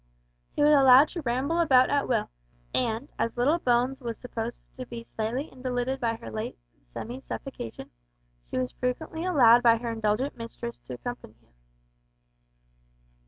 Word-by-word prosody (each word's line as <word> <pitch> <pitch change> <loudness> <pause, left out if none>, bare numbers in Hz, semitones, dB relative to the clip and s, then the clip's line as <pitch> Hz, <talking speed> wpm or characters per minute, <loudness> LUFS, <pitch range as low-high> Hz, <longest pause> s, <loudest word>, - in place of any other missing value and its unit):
He - - +2
was 300 - +6
allowed 270 0 +7
to 340 - -5
ramble 270 +6 0
about 260 -6 +5
at 285 -1 +1
will, 240 - 0 0.4
and, 235 +2 -1
as 230 - -1
little 290 +8 +3
Bones 250 0 +1
was 230 -3 -4
supposed 235 -1 -6
to 255 - -5
be 235 -1 -7
slightly 230 +5 -4
invalided 255 0 -2
by 230 -2 0
her 115 - -9
late 110 - -5 0.3
semi 245 - -6
suffocation, 265 - -7 0.6
she - - -3
was 125 0 -1
frequently 315 +6 -3
allowed 245 -10 +6
by 230 -1 +5
her 235 0 -4
indulgent 225 +4 -1
mistress 235 0 -7
to 125 - -5
accompany 245 - -7
him. - - -33
245 Hz, 155 wpm, -27 LUFS, 230-270 Hz, 0.6 s, allowed